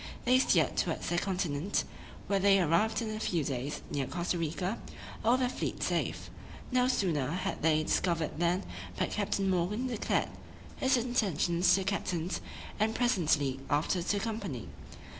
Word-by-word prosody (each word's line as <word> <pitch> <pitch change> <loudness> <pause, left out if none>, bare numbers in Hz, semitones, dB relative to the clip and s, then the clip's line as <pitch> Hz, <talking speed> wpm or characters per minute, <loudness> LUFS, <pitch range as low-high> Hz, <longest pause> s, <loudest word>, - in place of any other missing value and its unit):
They 250 +1 +5
steered - - +3
towards - - -1
the 175 - +2
continent, 180 -2 -1 0.4
where 200 -1 +1
they 195 0 +5
arrived 210 +7 +2
in 220 - -3
a 215 - -4
few 170 -7 0
days 135 +1 -3
near 140 -2 -1
Costa 175 +2 -2
Rica, 180 +6 -2 0.4
all 235 +3 +4
their 255 -1 +1
fleet 245 - -3
safe. - - -1 0.4
No 250 0 +3
sooner 165 - +1
had 180 +4 -2
they 155 -1 +3
discovered 165 -1 0
land 175 +3 +1 0.3
but - - 0
Captain 200 -1 0
Morgan 190 +6 0
declared 240 -4 0 0.5
his 260 0 +3
intentions 190 -8 +1
to 195 - 0
the - - -2
captains, 185 -3 -2 0.4
and 220 +1 +1
presently 155 - +2
after 155 +5 +1
to 170 - -1
the - - 0
company. 205 - -4
185 Hz, 160 wpm, -31 LUFS, 165-215 Hz, 0.5 s, They